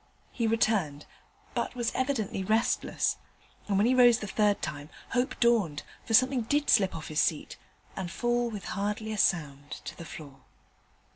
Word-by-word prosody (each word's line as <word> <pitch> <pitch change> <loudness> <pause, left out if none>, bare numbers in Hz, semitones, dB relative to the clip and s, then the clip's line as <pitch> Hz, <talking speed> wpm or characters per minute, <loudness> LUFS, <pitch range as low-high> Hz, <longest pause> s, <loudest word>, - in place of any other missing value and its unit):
He 230 -2 -1
returned, 205 -10 +1 0.5
but - - -2
was 240 -2 -1
evidently 255 -8 -1
restless: 220 +4 +1 0.5
and, 200 -2 +1
when 205 - +3
he 250 - +3
rose 245 -2 +6
the 215 - -6
third 205 0 +1
time, 145 0 -5 0.2
hope 250 +2 -1
dawned, 215 -11 +2 0.2
for 225 - +2
something 255 +1 +4
did 290 +6 +1
slip 195 -5 +4
off 160 - -7
his 155 -1 +1
seat 155 -3 -1 0.4
and 190 -2 -4
fall 240 +5 0
with 210 -3 -7
hardly 210 +2 -2
a - - -4
sound 145 -6 0 0.2
to - - -6
the - - -9
floor. 140 -4 -10
215 Hz, 165 wpm, -29 LUFS, 170-240 Hz, 0.5 s, rose